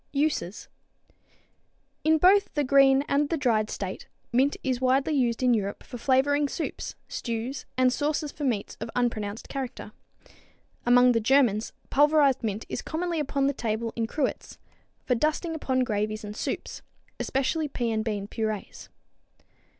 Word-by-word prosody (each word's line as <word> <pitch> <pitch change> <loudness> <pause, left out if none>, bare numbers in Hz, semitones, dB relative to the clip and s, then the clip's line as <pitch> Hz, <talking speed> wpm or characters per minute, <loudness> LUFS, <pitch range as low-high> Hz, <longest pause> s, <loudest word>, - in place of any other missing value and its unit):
Uses. 280 - -1 1.4
In 315 +1 +4
both 385 +5 +5
the 295 - +2
green 275 0 +5
and 285 +1 +1
the 330 - 0
dried 225 -6 +1
state 190 -2 -5 0.2
mint 265 +4 +2
is 255 -2 -1
widely 265 +4 +2
used 245 -3 +1
in 250 -1 +4
Europe 200 -3 -2
for 245 - -9
flavoring 280 +3 +2
soups, 320 - -4
stews 235 +3 -4
and 255 -1 +4
sauces 295 +1 -1
for 295 - -7
meats 235 -7 -1
of 225 - -5
unpronounced 220 -4 -2
character. 270 -3 -5 1.0
Among 245 +1 +6
the 230 - +2
Germans 225 -2 +3 0.2
pulverized 290 -2 +4
mint 215 0 -2
is - - -4
commonly 340 0 -2
upon 275 -1 0
the 280 - +2
table 230 -2 -2
in 230 -1 -1
cruets 285 +3 -3 0.5
for 250 - +2
dusting 310 +6 0
upon 260 -5 0
gravies 215 -2 -2
and 210 0 -7
soups, - - -4 0.4
especially 295 +4 0
pea 240 -4 -2
and 220 -1 0
bean 205 -3 -3
purees. 215 -2 -4
255 Hz, 150 wpm, -27 LUFS, 225-285 Hz, 1.4 s, Among